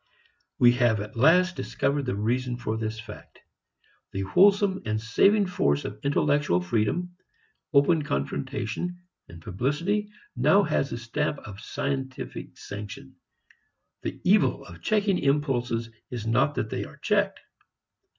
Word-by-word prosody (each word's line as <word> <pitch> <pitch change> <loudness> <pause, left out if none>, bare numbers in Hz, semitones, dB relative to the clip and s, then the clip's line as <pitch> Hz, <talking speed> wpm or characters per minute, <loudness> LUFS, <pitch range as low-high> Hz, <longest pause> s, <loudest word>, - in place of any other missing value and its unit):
We 120 -1 +7
have 115 -3 +4
at 105 +3 -7
last 180 +9 +4
discovered 135 +3 -1
the 110 - -1
reason 120 +4 -1
for 115 -2 -3
this 110 0 -3
fact. 110 - -11 0.8
The 95 - -2
wholesome 195 - +4
and 110 0 -1
saving 195 - +3
force 75 - 0
of 105 - -6
intellectual 145 -8 +2
freedom, 110 - -1 0.6
open 155 +2 +4
confrontation, 115 - -3 0.4
publicity, 150 - -1 0.3
now 155 +11 +4
has 140 - 0
the - - -4
stamp 150 +6 -2
of 100 -1 -9
scientific 135 0 -4
sanction. 105 +1 -8 0.9
The - - -5
evil - - +3
of 85 0 -12
checking 205 -3 +1
impulses 125 -5 0 0.2
is 120 -3 -5
not 120 +6 +2
that 110 - -2
they - - -2
are - - -11
checked. - - +1
125 Hz, 130 wpm, -26 LUFS, 110-155 Hz, 0.9 s, We